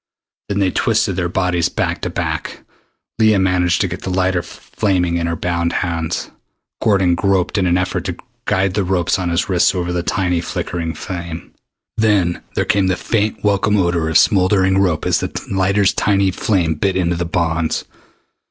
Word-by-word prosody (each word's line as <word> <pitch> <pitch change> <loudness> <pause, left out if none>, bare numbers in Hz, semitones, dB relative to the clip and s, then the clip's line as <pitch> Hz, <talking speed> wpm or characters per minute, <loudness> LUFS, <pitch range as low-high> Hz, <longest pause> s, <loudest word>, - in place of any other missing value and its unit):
Then 100 - -1
they 95 -2 +2
twisted - - +1
their 90 -2 -1
bodies 90 -2 0
back - - -2
to - - -2
back. - - -4 0.6
Leah 110 -2 +5
managed 90 -2 +2
to 95 - +1
get 90 +1 -6
the - - -4
lighter 95 -1 +1
flaming 90 -1 -1
in 85 0 -1
her 85 - -1
bound 85 0 -1
hands. 85 -2 -3 0.5
Gordon 95 -5 +3
groped 95 0 +1
in 95 -3 +2
an 90 0 +3
effort 90 0 -2
to - - -3 0.3
guide 95 0 +1
the 100 0 0
ropes 90 0 0
on 90 -2 -1
his 85 0 0
wrists 90 0 +2
over 90 -1 -2
the 90 - 0
tiny 90 -1 0
flickering 85 -1 -4
flame. 85 -3 -7 0.4
Then 100 -6 +2
there - - +1
came 100 -1 +2
the 95 0 +1
faint 105 +1 -1
welcome 105 0 +2
odor 85 -4 +1
of 80 - +4
smoldering 95 -2 +3
rope 90 -5 +1
as - - +2
the - - -3 0.2
lighter's 100 +1 +2
tiny 100 -3 +2
flame 90 -4 0
bit 95 +5 -1
into 85 -2 +1
the 85 - -2
bonds. 85 -2 -1
90 Hz, 180 wpm, -18 LUFS, 85-95 Hz, 0.6 s, Leah